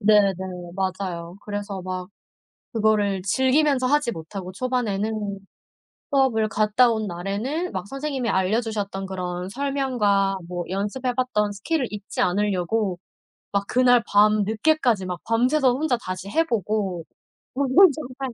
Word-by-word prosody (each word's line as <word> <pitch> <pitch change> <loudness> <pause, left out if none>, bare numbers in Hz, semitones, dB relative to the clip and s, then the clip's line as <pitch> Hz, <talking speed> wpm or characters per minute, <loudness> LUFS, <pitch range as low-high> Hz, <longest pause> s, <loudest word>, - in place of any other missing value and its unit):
네네 205 -2 +5 0.4
맞아요. 185 -2 -3
그래서 205 -2 -4
막 185 0 -5 0.6
그거를 210 -4 +2
즐기면서 260 +6 +2
하지 290 -2 +2
못하고 185 +1 -7
초반에는 215 -3 -2 0.7
수업을 255 -6 +2
갔다 215 +3 +3
온 220 -2 -1
날에는 200 - -3
막 185 -1 -4
선생님이 275 -3 -3
알려 190 +5 +2
주셨던 200 -4 -4
그런 180 -1 -4
설명과 240 -7 +1
뭐 175 -1 -3
연습해 210 +7 -2
봤던 225 -5 0
스킬을 255 +8 -1
잊지 205 0 -5
않으려고 195 0 0 0.5
막 200 0 0
그날 245 -1 +4
밤늦게까지 215 +3 +3
막 180 -1 -4
밤새서 250 +3 +3
혼자 270 -2 0
다시 185 -4 -6
해 325 +10 +3
보고. 210 - -1 0.5
저는 275 +1 0 0.2
정말 260 -2 -6
210 Hz, 285 characters per minute, -24 LUFS, 195-255 Hz, 0.7 s, 네네